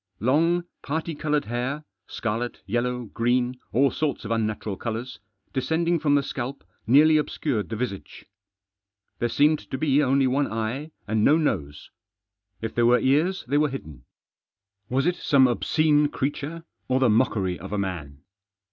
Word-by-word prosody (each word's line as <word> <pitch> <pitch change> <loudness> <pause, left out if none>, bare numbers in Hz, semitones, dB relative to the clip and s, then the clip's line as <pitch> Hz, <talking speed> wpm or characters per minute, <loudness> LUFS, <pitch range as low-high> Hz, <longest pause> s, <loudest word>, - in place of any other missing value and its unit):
Long 165 - +2 0.2
parti 160 +3 -3
coloured 150 0 -1
hair 125 +6 -3
— - - -56
scarlet, 115 +2 -3
yellow, 125 +3 -1
green, 120 +3 0
all 135 +3 +3
sorts 150 -6 -2
of 110 - -4
unnatural 110 -2 -1
colours 115 +1 -5 0.2
— 95 0 -44
descending 165 +5 +1
from 145 -2 +2
the 140 - +2
scalp 135 0 -5 0.2
nearly 155 +6 +6
obscured 140 -6 -1
the 115 - -3
visage. 110 -4 -5 0.9
There 120 - 0
seemed 150 +5 +3
to 130 - -3
be 145 0 +3
only 135 -1 +3
one 135 +3 +1
eye 115 +7 -3 0.2
and 110 0 +1
no 150 +6 +5
nose. 75 - -2 0.7
If 110 - -3
there 120 0 +3
were 125 +1 +6
ears 160 +8 +1
they 145 +3 +2
were 150 -1 +2
hidden. 80 - -8 0.8
Was 135 +3 +1
it 175 0 +1
some 135 -2 +4
obscene 150 +4 +2
creature 145 +3 -4 0.2
or 130 0 +2
the 130 - +4
mockery 105 -5 +1
of - - -8
a 105 - -1
man 80 -8 -4
130 Hz, 160 wpm, -25 LUFS, 115-150 Hz, 0.9 s, nearly